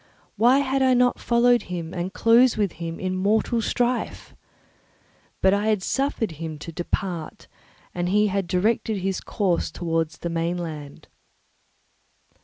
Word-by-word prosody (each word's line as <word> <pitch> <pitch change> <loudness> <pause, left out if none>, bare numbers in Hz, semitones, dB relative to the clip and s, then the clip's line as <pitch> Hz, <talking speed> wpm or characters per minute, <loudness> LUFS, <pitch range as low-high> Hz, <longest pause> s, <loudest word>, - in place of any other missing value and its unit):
Why 245 +6 +4
had 270 +1 0
I 260 -1 +4
not 245 0 +3
followed 240 0 +3
him 170 -1 -5
and 180 +1 -3
closed 230 +4 +4
with 205 -4 +1
him 165 0 -4
in 185 0 -2
mortal 215 +4 +1
strife? 245 +2 -2 1.1
But 190 0 +5
I 205 +2 0
had 210 -4 +1
suffered 270 -6 -1
him 160 0 -6
to 150 +3 -8
depart, 175 -1 -4 0.5
and 175 0 -2
he 210 +2 +3
had 195 -2 -1
directed 210 +4 0
his 190 0 -2
course 190 -5 -1
towards 165 -1 -2
the 170 - -4
mainland. 165 -3 -4
190 Hz, 140 wpm, -24 LUFS, 170-230 Hz, 1.1 s, But